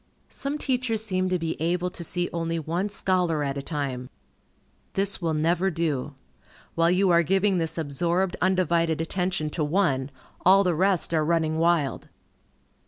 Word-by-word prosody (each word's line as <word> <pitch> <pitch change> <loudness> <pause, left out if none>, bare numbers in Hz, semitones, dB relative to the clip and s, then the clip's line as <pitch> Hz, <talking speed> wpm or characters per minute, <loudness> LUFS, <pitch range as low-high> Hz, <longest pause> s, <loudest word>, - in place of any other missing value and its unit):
Some 280 +2 -3
teachers 250 -6 -1
seem 185 -3 -1
to 185 - +1
be 165 -2 -4
able 175 +2 0
to 175 - -6
see 175 +2 -1
only 165 0 -2
one 170 +5 -2
scholar 180 -6 0
at 140 -1 -2
a 140 - -3
time. 135 -4 -4 0.8
This 195 0 -1
will 165 -2 0
never 170 +5 +1
do. 155 -5 -2 0.6
While 165 0 +3
you 185 +1 +3
are 170 0 +5
giving 190 +3 +2
this 165 0 0
absorbed, 170 +5 0
undivided 170 -3 +1
attention 165 -2 -2
to 155 - -1
one, 145 -5 +1 0.3
all 195 +2 +6
the 180 -2 +1
rest 185 0 +1
are 155 -1 +2
running 160 0 +1
wild. 165 -4 +1
170 Hz, 160 wpm, -25 LUFS, 160-185 Hz, 0.8 s, all